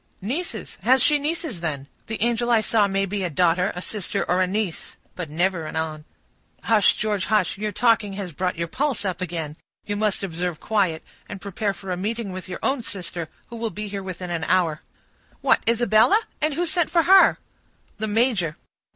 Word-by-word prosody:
"Nieces? 275 Hz, -, -4 dB
Has 260 Hz, +1 st, +4 dB
she 295 Hz, -1 st, +4 dB
nieces, 305 Hz, -, -2 dB
then? 145 Hz, -5 st, -3 dB, 0.2 s
The 220 Hz, -, -4 dB
angel 240 Hz, 0 st, +1 dB
I 230 Hz, -2 st, +5 dB
saw 215 Hz, -2 st, +3 dB
may 195 Hz, 0 st, 0 dB
be 195 Hz, 0 st, -3 dB
a 180 Hz, -, -1 dB
daughter, 180 Hz, +3 st, +2 dB
a 180 Hz, -, -5 dB
sister, 210 Hz, -5 st, -1 dB
or 180 Hz, +1 st, +2 dB
a 185 Hz, -, +3 dB
niece,—but 185 Hz, -3 st, -4 dB
never 170 Hz, +1 st, 0 dB
an -, -, -7 dB
aunt." 155 Hz, -1 st, -3 dB, 0.6 s
"Hush, 220 Hz, -3 st, +4 dB
George, 210 Hz, -3 st, 0 dB
hush; 205 Hz, -3 st, +1 dB
your 210 Hz, 0 st, -1 dB
talking 220 Hz, -1 st, +2 dB
has 195 Hz, -3 st, -5 dB
brought 180 Hz, +3 st, -2 dB
your 170 Hz, 0 st, -2 dB
pulse 265 Hz, -, -1 dB
up 185 Hz, -2 st, -2 dB
again. 160 Hz, -4 st, -4 dB, 0.3 s
You 205 Hz, -, -2 dB
must 210 Hz, -1 st, 0 dB
observe 175 Hz, -2 st, -3 dB
quiet, 190 Hz, -7 st, 0 dB, 0.3 s
and 200 Hz, -, -6 dB
prepare 200 Hz, +1 st, -2 dB
for 195 Hz, -2 st, -7 dB
a 180 Hz, -, -1 dB
meeting 215 Hz, +2 st, -3 dB
with 185 Hz, 0 st, -7 dB
your -, -, -4 dB
own 270 Hz, -1 st, +1 dB
sister, 175 Hz, -6 st, -4 dB, 0.2 s
who -, -, -6 dB
will 230 Hz, 0 st, -2 dB
be 210 Hz, 0 st, -5 dB
here 200 Hz, -1 st, -4 dB
within 185 Hz, -1 st, -6 dB
an 165 Hz, -2 st, -2 dB
hour." 170 Hz, -3 st, +2 dB, 0.6 s
"What, -, -, +4 dB
Isabella! 235 Hz, -, +5 dB, 0.2 s
And 305 Hz, -1 st, +1 dB
who 350 Hz, -, 0 dB
sent 335 Hz, 0 st, +1 dB
for 335 Hz, 0 st, +3 dB
her?" 380 Hz, +2 st, +7 dB, 0.6 s
"The 220 Hz, -, -1 dB
major." 210 Hz, -8 st, +1 dB
200 Hz, 195 wpm, -24 LUFS, 180-230 Hz, 0.6 s, her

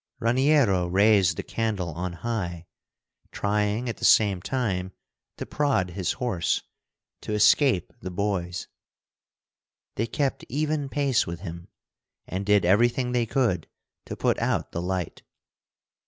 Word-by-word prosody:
Raniero 120 Hz, -, +3 dB
raised 95 Hz, -2 st, +4 dB
the -, -, -3 dB
candle 105 Hz, -6 st, -2 dB
on 85 Hz, +2 st, -4 dB
high, 85 Hz, -3 st, -4 dB, 0.7 s
trying 105 Hz, +3 st, -1 dB
at 115 Hz, -, -3 dB
the -, -, -12 dB
same 100 Hz, -4 st, +4 dB
time 95 Hz, -7 st, -2 dB, 0.4 s
to -, -, -5 dB
prod 135 Hz, -12 st, 0 dB
his 90 Hz, 0 st, -2 dB
horse, 110 Hz, -9 st, -1 dB, 0.6 s
to 105 Hz, -, -4 dB
escape 105 Hz, -, +3 dB
the 95 Hz, -, -6 dB
boys. 90 Hz, -2 st, -2 dB, 1.3 s
They 115 Hz, -, 0 dB
kept 135 Hz, +4 st, -1 dB
even 150 Hz, +1 st, -1 dB
pace 140 Hz, -3 st, +1 dB
with 85 Hz, 0 st, -6 dB
him, 85 Hz, -2 st, -8 dB, 0.6 s
and 95 Hz, +2 st, -5 dB
did 105 Hz, -3 st, +4 dB
everything 120 Hz, +6 st, +3 dB
they 120 Hz, -2 st, +1 dB
could 110 Hz, -, 0 dB, 0.4 s
to -, -, -6 dB
put -, -, +1 dB
out -, -, -1 dB
the 85 Hz, -, -3 dB
light. 90 Hz, -2 st, -3 dB
105 Hz, 130 wpm, -26 LUFS, 90-120 Hz, 1.3 s, raised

